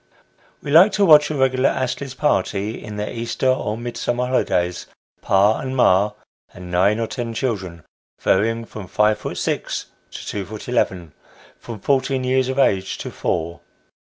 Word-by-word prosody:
We 140 - -4
like 175 +7 +7
to 205 - +3
watch 150 -3 +7
a 155 - -3
regular 130 -1 +2
Astley's 130 +1 -3
party 105 -5 -1
in 105 -2 -7
the 105 +2 -4
Easter 115 +3 -3
or 115 -4 0
Mid 120 0 -6
summer 120 +1 -1
holidays 90 -8 0 0.3
pa 100 +3 +3
and 130 0 -4
ma, 100 -2 +4 0.4
and 90 0 -9
nine 100 +5 +2
or 115 - 0
ten 115 -1 -5
children, 95 - -3 0.4
varying 115 +4 +1
from 105 -3 -9
five 105 +2 +2
foot - - -6
six - - -3 0.2
to - - -9
two 100 - -4
foot 105 +1 -9
eleven: 95 -9 -1 0.5
from 115 -3 -8
fourteen 135 +2 0
years 130 0 +1
of 130 - -3
age 95 -8 +1
to - - -6
four. 85 +1 -3
115 Hz, 165 wpm, -21 LUFS, 100-130 Hz, 0.5 s, like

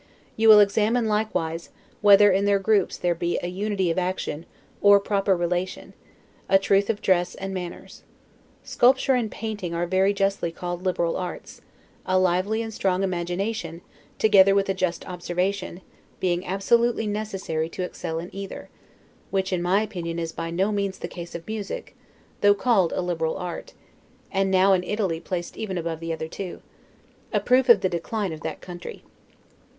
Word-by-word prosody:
You 225 0 +4
will 210 -1 +10
examine, 220 +3 +2
likewise, 175 -6 -1 0.3
whether 205 0 +7
in 195 +2 +2
their 200 0 +4
groups 200 0 +1
there 175 -1 +1
be 170 +1 -2
a - - -1
unity 190 -1 -1
of 165 - 0
action, 180 -3 -3 0.3
or 205 0 +7
proper 200 -1 +1
relation; 175 +2 -3 0.6
a 195 - +7
truth 195 +1 +2
of 215 -2 -2
dress 180 -2 +2
and 195 0 -5
manners. 180 -2 -7 0.6
Sculpture 265 +2 +3
and 240 -4 0
painting 210 -7 -5
are 170 +1 0
very 190 +2 +2
justly 195 -3 0
called 175 +1 -5
liberal 175 -3 0
arts; 180 -1 -7 0.4
a 185 - +1
lively 185 +5 +1
and 225 -1 -6
strong 190 -1 0
imagination, 175 0 -3 0.4
together 195 -2 +5
with 200 0 +2
a - - +2
just 185 -2 -2
observation, 180 +1 -3 0.4
being 180 0 -1
absolutely 225 +5 +2
necessary 195 -7 -3
to 185 - -5
excel 160 -2 -5
in 170 +2 -7
either; 195 0 -7 0.6
which, 190 -1 -1
in 180 - 0
my 190 +4 +2
opinion, 175 -6 -5
is 165 -1 -3
by 165 0 -5
no 190 +5 0
means 200 -2 -2
the - - -5
case 170 -1 -9
of 170 -1 -7
music, 220 - -6 0.5
though 205 0 +6
called 200 -6 +2
a - - -1
liberal 165 -3 -2
art, 180 -1 -6 0.6
and 195 0 +1
now 190 +1 +4
in 180 -1 +2
Italy 190 -4 -1
placed 175 0 -5
even 195 -4 -3
above 165 -1 -3
the 165 0 -4
other 160 -1 -4
two; 185 +2 -7 0.7
a - - +2
proof 255 0 +2
of 220 -5 +8
the 190 - +2
decline 185 +2 -3
of 155 - -9
that - - -5
country. 175 -1 -9
190 Hz, 170 wpm, -24 LUFS, 175-205 Hz, 0.7 s, will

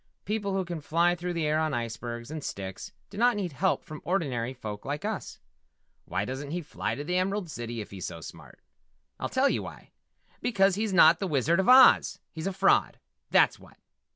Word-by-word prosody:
"People 205 -2 -2
who 190 -1 0
can 170 -2 -5
fly 170 +4 +2
through 175 0 -4
the 165 -2 -1
air 155 +1 +1
on 155 -3 0
icebergs 120 +1 -5
and 155 -2 -5
sticks 95 -5 -6 0.2
do 200 - -7
not 245 +1 +4
need 190 -4 -3
help 185 +7 0
from 155 -1 -9
ordinary 135 -10 -1
folk 105 -5 -7
like 145 +6 -4
us. 215 -3 -4 0.7
Why - - -2
doesn't 135 +2 -5
he 175 +4 -3
fly - - -3
to 145 - -5
the 180 +4 -1
Emerald 190 -2 -1
City 120 -2 -5
if 105 - -10
he's 95 -3 -5
so 85 - -7
smart? 80 - -12 0.6
I'll - - -3
tell 260 +2 +3
you - - 0
why - - -10 0.5
because 195 -4 +3
he's 210 +2 -1
not 165 -3 +6
the 195 - -2
Wizard 160 +3 +2
of 190 - +2
Oz! 260 0 +7
He's 160 +2 -5
a - - 0
fraud, 195 +1 +2 0.3
that's - - +4
what!" - - -18
165 Hz, 205 wpm, -28 LUFS, 130-195 Hz, 0.7 s, Oz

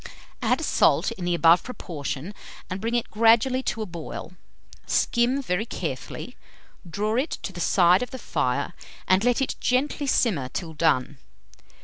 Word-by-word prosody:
Add - - +1
salt - - +3
in 180 - -6
the 175 0 +1
above 170 +1 +5
proportion, 165 - -6 0.4
and 185 +1 -4
bring 230 +2 -1
it 240 - -1
gradually 230 +4 +4
to 225 -4 -2
a - - -5
boil. 170 0 -7 0.5
Skim 250 +4 +1
very 215 +1 -1
carefully, - - -5 0.5
draw 210 +7 -1
it 280 +5 -1
to 195 - -5
the 175 - -6
side 180 +1 +4
of 250 - -3
the 260 - -7
fire, - - -1 0.3
and 185 +2 +4
let 245 +2 +2
it - - -3
gently 280 +3 0
simmer 175 - +1
till 165 +1 -5
done. 145 -3 +1
210 Hz, 155 wpm, -25 LUFS, 170-245 Hz, 0.5 s, above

